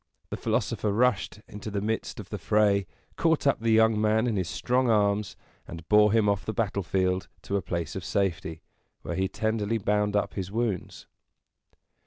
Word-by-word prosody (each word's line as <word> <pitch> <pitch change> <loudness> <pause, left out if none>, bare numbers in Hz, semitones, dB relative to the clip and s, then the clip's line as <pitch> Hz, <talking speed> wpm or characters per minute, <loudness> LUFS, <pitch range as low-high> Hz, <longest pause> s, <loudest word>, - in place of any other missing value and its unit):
The - - -1
philosopher 105 - -1
rushed 120 -1 +1
into 105 +1 -7
the 100 -1 -2
midst 110 +4 -3
of 100 - -9
the 105 - -4
fray, 100 0 +2 0.3
caught 165 -3 +2
up 140 - +3
the 115 +1 -1
young 110 -1 +4
man 110 +2 +2
in 115 -3 0
his 90 -4 -1
strong 125 0 +1
arms, 105 -3 +1 0.3
and 85 -1 -9
bore 105 0 +6
him 110 -1 +3
off 100 -1 +1
the 110 - -3
battlefield 95 -3 0 0.2
to 100 - -3
a 100 - +1
place 85 -3 -4
of 95 - -4
safety, 90 -5 -2 0.4
where - - -4
he 95 0 0
tenderly 110 +1 -1
bound 105 0 0
up 105 - 0
his 95 -1 -4
wounds. 110 -4 -3
105 Hz, 180 wpm, -27 LUFS, 95-110 Hz, 0.4 s, bore